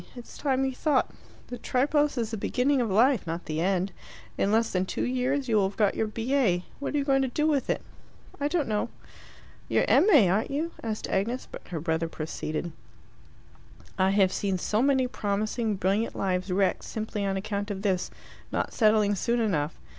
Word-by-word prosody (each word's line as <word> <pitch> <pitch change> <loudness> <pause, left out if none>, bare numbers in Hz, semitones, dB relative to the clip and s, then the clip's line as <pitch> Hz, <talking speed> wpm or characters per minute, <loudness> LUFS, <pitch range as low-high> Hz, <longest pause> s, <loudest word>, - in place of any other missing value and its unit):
It's 245 -1 -10
time 270 -2 0
you 265 - 0
thought. 275 0 +1 0.4
The 245 -1 -6
Tripos 290 +4 +1
is 225 -2 -1
the - - -2
beginning 260 +6 +1
of 230 - -1
life, 225 +1 +3
not 165 +2 -4
the 155 +1 -2
end. 190 +1 +1 0.4
In 200 - +1
less 225 +1 +2
than 185 0 0
two - - -2
years 255 +2 0
you 225 -2 +2
will 195 -2 +3
have 195 - -15
got 210 -3 +3
your 220 - -1
B.A. 225 -5 0
What 285 - -3
are - - +3
you 285 - +1
going 270 -1 +2
to 265 - +1
do 300 +5 -1
with 295 -4 +1
it?" - - 0 0.6
"I 285 - +1
don't 305 -2 0
know." 215 +1 -1 0.8
"You're - - +3
M.A., 300 - +6
aren't 195 +5 +1
you?" 310 +4 -2
asked 220 -2 -3
Agnes; 230 +7 -1
but - - -10
her 170 -3 -4
brother 160 +1 -1
proceeded 155 +1 -4 1.2
"I 190 -1 +3
have 195 -1 +3
seen 195 -2 -1
so 210 +4 0
many 265 -1 +3
promising, 215 0 -1
brilliant 195 +4 0
lives 185 -1 -1
wrecked 190 +1 +1
simply 215 -2 -4
on 195 -1 0
account 200 +1 -3
of 200 -1 -4
this 190 -3 0 0.4
not - - -2
settling 215 -2 +3
soon 235 +4 0
enough. 165 -9 -1
215 Hz, 190 wpm, -27 LUFS, 190-255 Hz, 1.2 s, M.A